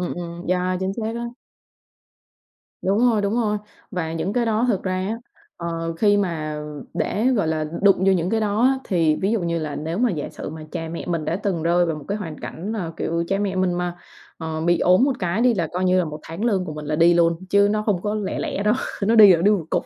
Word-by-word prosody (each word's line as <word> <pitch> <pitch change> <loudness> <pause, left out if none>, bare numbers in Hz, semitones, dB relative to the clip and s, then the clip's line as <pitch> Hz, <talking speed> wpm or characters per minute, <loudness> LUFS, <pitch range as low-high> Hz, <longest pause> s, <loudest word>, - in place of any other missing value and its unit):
ừm, 180 - -2
ừm, 170 0 -7
yeah, 185 0 +1
chính 190 +1 -1
xác 225 0 -3
á. 235 - -3 1.6
Đúng 195 +2 +1
rồi, 215 -3 +1
đúng 200 +2 0
rồi. 215 -3 +1 0.3
Và 165 -4 -3
những 165 +4 -2
cái 240 +1 +1
đó 225 +1 +1
thực 200 -6 +1
ra 185 -1 -1
á, 190 +4 -2 0.4
ờ, 165 -1 -3
khi 205 0 +4
mà 160 -6 -1 0.4
để, 220 +4 0
gọi 225 -10 +2
là, 155 -1 0 0.2
đụng 200 -1 +6
vô 190 +1 +3
những 180 -1 0
cái 225 - +1
đó 210 +1 0
á, 265 +1 +4
thì 165 -4 +2
ví 195 +3 0
dụ 230 - +1
như 170 -1 -1
là 155 -3 -4
nếu 160 +4 -3
mà 245 0 +3
giả 155 -6 -3
sử - - -7
mà 155 0 -8
cha 165 -2 -4
mẹ 165 - -6
mình 170 -3 -1
đã 170 - -1
từng 190 -5 -2
rơi 175 +1 +3
vào 165 -2 -2
một 150 - -9
cái 205 - -1
hoàn 160 -7 -6
cảnh 195 +7 -5
là, 180 -7 -3
kiểu, 170 +1 -1
cha 195 - +1
mẹ 200 -2 -1
mình 185 -1 +2
mà, 175 0 -2 0.4
ờ, 160 -1 -4
bị 175 +1 +2
ốm 185 +7 +4
một 275 - +2
cái 180 +3 -1
đi 245 0 +4
là 175 -5 0
coi 180 +1 -1
như 185 0 +3
là 180 - +2
1 150 -1 -6
tháng 165 +7 -5
lương 200 -6 +1
của 155 - -6
mình 150 -1 -7
là 150 +1 -1
đi 170 +2 +5
luôn, 170 -1 +3
chứ 200 0 +5
nó 215 0 0
không 200 -5 0
có 210 0 -1
lẻ 210 -3 -2
lẻ 200 - -2
đâu, 210 +2 +3 0.3
nó 220 +3 +3
đi 210 -4 +9
là 165 - -2
đi 205 - +5
một 200 -6 +1
cục. - - 0
185 Hz, 265 wpm, -22 LUFS, 165-205 Hz, 1.6 s, đi